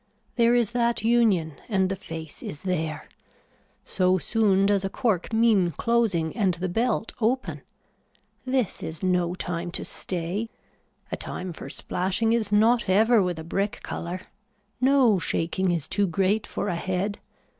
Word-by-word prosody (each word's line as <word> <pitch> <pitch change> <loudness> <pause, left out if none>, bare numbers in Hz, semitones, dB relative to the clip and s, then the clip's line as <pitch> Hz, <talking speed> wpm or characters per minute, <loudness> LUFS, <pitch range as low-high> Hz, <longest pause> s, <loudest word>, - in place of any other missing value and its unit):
There 235 0 +4
is 235 -3 +2
that 235 -2 0
union 210 - +2
and 190 -3 +2
the 195 - -2
face 160 -4 -8
is 145 - -7
there. 160 -5 -2 0.8
So 185 -1 +2
soon 195 -1 +2
does 200 -1 +2
a 195 - -1
cork 205 -4 -1
mean 220 -5 +4
closing 195 -4 0
and 195 -6 +1
the 180 +2 -3
belt 225 +4 0
open. 250 +4 0 0.8
This 255 -5 -1
is 160 +2 -6
no 180 -1 +1
time 175 -1 -3
to - - -3
stay. 185 +5 -3 0.6
A - - 0
time 180 -1 -5
for - - -9
splashing 190 +5 -1
is 220 -3 0
not 225 +1 +3
ever 220 +4 +5
with 180 -3 -1
a 160 - -6
brick 195 +5 -2
color. 175 +2 -5 0.6
No 255 -6 +4
shaking 175 +3 0
is 170 -4 -1
too 200 0 +1
great 195 +5 +1
for - - -3
a 180 - -1
head. 185 +4 -2
195 Hz, 155 wpm, -25 LUFS, 175-225 Hz, 0.8 s, ever